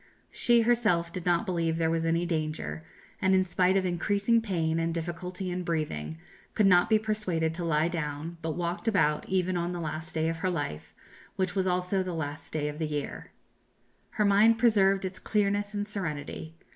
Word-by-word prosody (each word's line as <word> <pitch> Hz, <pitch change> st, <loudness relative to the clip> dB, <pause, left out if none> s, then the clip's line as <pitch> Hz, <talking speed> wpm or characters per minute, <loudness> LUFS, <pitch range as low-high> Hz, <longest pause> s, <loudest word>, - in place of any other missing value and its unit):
She 240 Hz, -1 st, +3 dB
herself 210 Hz, -8 st, +2 dB
did 180 Hz, -1 st, -5 dB
not 175 Hz, +4 st, +2 dB
believe 165 Hz, -4 st, 0 dB
there 165 Hz, -1 st, +1 dB
was 165 Hz, 0 st, 0 dB
any 165 Hz, +1 st, +1 dB
danger; 155 Hz, -1 st, -3 dB, 0.4 s
and 190 Hz, 0 st, +4 dB
in 185 Hz, 0 st, +3 dB
spite 185 Hz, +1 st, +2 dB
of 190 Hz, -, +1 dB
increasing 200 Hz, +6 st, +2 dB
pain 165 Hz, -6 st, 0 dB
and 165 Hz, 0 st, 0 dB
difficulty 180 Hz, +2 st, -4 dB
in 180 Hz, +1 st, -2 dB
breathing, 150 Hz, -, -3 dB, 0.4 s
could 210 Hz, -, +4 dB
not 180 Hz, -2 st, +5 dB
be 220 Hz, -, +5 dB
persuaded 210 Hz, -7 st, -1 dB
to 175 Hz, +1 st, -4 dB
lie 160 Hz, -1 st, +2 dB
down, 165 Hz, 0 st, -4 dB
but 160 Hz, -1 st, -3 dB
walked 175 Hz, +5 st, -3 dB
about 160 Hz, -8 st, +2 dB
even 185 Hz, -1 st, +1 dB
on 175 Hz, +1 st, -2 dB
the 175 Hz, -, -4 dB
last 160 Hz, +1 st, -5 dB
day 160 Hz, 0 st, +1 dB
of 165 Hz, 0 st, -1 dB
her 185 Hz, +3 st, -1 dB
life, 145 Hz, -, -4 dB, 0.4 s
which 185 Hz, -1 st, -1 dB
was 190 Hz, 0 st, 0 dB
also 180 Hz, +1 st, +1 dB
the 185 Hz, -2 st, -3 dB
last 150 Hz, -2 st, -5 dB
day 150 Hz, -1 st, -1 dB
of 150 Hz, +1 st, -5 dB
the 160 Hz, -, -1 dB
year. 150 Hz, -2 st, -4 dB, 0.8 s
Her 210 Hz, -, +1 dB
mind 210 Hz, +3 st, +5 dB
preserved 195 Hz, -5 st, +3 dB
its 185 Hz, 0 st, -5 dB
clearness 205 Hz, 0 st, 0 dB
and 205 Hz, 0 st, -2 dB
serenity. 160 Hz, -4 st, -5 dB
175 Hz, 190 wpm, -28 LUFS, 160-195 Hz, 0.8 s, not